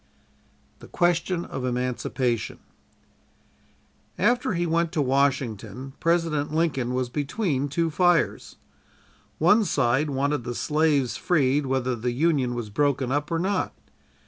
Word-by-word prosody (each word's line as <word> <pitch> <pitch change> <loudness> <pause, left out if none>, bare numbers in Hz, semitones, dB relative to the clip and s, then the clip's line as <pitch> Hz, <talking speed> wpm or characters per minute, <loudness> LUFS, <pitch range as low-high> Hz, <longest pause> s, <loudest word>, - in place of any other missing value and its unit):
THE - - -13
QUESTION 175 0 0
OF 130 - -6
EMANCIPATION 125 -1 -2 1.6
After 245 -1 +2
he 175 +1 0
went 170 0 +1
to 165 - -1
Washington, 135 -1 -1
President 165 -4 +1
Lincoln 145 -6 0
was 130 -1 0
between 145 - -1
two 165 +3 0
fires. 175 +1 +1 0.8
One 190 - +4
side 140 -3 +1
wanted 140 -1 -1
the 120 +1 -5
slaves 150 -4 +1
freed 145 -4 +1
whether 130 -1 0
the 120 +1 -2
Union 135 -3 +1
was 115 -3 -5
broken 135 +1 0
up 145 +1 -1
or 165 - 0
not. 190 +4 -1
145 Hz, 120 wpm, -25 LUFS, 130-165 Hz, 1.6 s, One